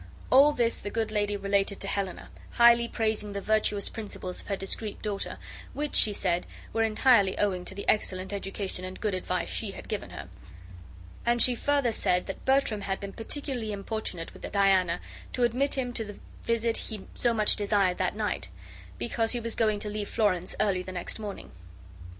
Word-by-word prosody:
All 280 +3 +8
this 235 -4 +1
the 205 - -5
good 220 0 -2
lady 205 -1 0
related 200 0 +1
to 195 - -1
Helena, 195 -2 -3 0.2
highly 235 0 +6
praising 215 -3 -1
the 200 - -2
virtuous 210 -1 +2
principles 200 -4 -5
of - - -16
her 200 - 0
discreet 200 +2 -4
daughter, 205 -2 -3 0.4
which 295 0 -3
she 215 - +5
said 180 -3 -1 0.3
were 225 - +1
entirely 220 -2 +4
owing 190 -3 +1
to 190 - -4
the 200 - -6
excellent 190 -2 +1
education 195 -1 -4
and 185 0 -7
good 210 -3 -1
advice 185 - -2
she - - -2
had - - -10
given - - -4
her; - - -8 1.0
and 240 0 +2
she 250 - +6
further 280 0 +1
said 180 -4 +1
that 195 - -7
Bertram 265 -6 +3
had 195 -1 -2
been 200 -1 -7
particularly 240 -1 -1
importunate 200 -4 -4
with - - -8
Diana 190 -3 +3 0.3
to 250 - 0
admit 255 +4 +2
him 250 -2 -1
to 230 - -1
the 205 -2 -9 0.3
visit 230 0 +1
he 215 -3 -5
so 240 - +2
much 215 -2 +4
desired 200 -3 +1
that 185 +1 0
night, 210 - -2 0.5
because 225 - +1
he 240 - 0
was 230 -1 0
going 215 -2 +2
to 210 - 0
leave 210 -1 -4
Florence 185 -5 0
early 195 -3 +2
the 185 - -7
next 180 +4 -4
morning. 210 -2 -7
210 Hz, 185 wpm, -28 LUFS, 195-230 Hz, 1.0 s, All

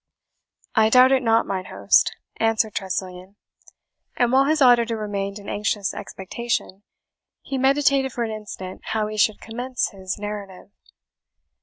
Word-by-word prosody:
"I 220 -2 +4
doubt 255 +3 +6
it 265 -1 +3
not, 225 -1 +3
mine 185 -1 -3
host," 100 - +2 0.2
answered 225 -1 +1
Tressilian; 185 0 -5 0.8
and 245 -1 +2
while 265 +1 +4
his 310 +2 +2
auditor 240 -3 +4
remained 200 -1 -3
in 205 - -11
anxious 205 -1 -1
expectation, 200 0 -4 0.6
he 270 -1 -3
meditated 275 0 +3
for 235 - -2
an 225 - -3
instant 205 -3 -8
how 220 -1 -1
he 215 0 -5
should 215 0 +2
commence 245 +3 -3
his 190 -1 -5
narrative. 205 -2 -7
215 Hz, 140 wpm, -23 LUFS, 195-245 Hz, 0.8 s, doubt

